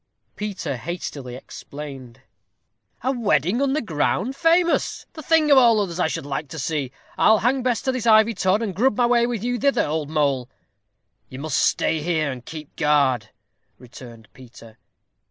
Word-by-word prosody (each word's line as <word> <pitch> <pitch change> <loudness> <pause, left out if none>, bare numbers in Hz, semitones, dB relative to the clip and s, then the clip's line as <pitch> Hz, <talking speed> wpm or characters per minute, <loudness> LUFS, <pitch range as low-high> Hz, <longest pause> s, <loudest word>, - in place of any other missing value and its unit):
Peter 195 -10 -4
hastily 140 -4 -6
explained. 135 -2 -10 0.8
"A 260 - +1
wedding 205 - +1
under 280 +2 +1
ground? 190 - -1
famous! 335 +3 +1
the 315 - -8
thing 310 0 +2
of 275 - +8
all 230 -3 +5
others 185 -4 -3
I 180 - +2
should 155 - -4
like 145 +2 -4
to 160 - -9
see. 145 -2 -2 0.3
I'll 220 - +5
hang 255 +5 +1
Bess 245 -3 -1
to 260 - +1
this 255 -3 -3
ivy 220 +1 +5
tod, 190 +2 +1
and 205 -4 -3
grub 240 +1 +2
my 245 - +3
way 240 0 +3
with 235 -4 -4
you 245 0 -1
thither, 280 +2 +2
old 150 -1 -3
mole." 140 -5 0 0.8
"You 130 - -9
must 150 +1 -1
stay 160 -1 +1
here, 155 -3 0
and 125 -2 -8
keep 155 0 -10
guard," 135 -7 +2 0.5
returned 120 -2 -13
Peter. 115 -3 -15
170 Hz, 170 wpm, -22 LUFS, -, 0.8 s, of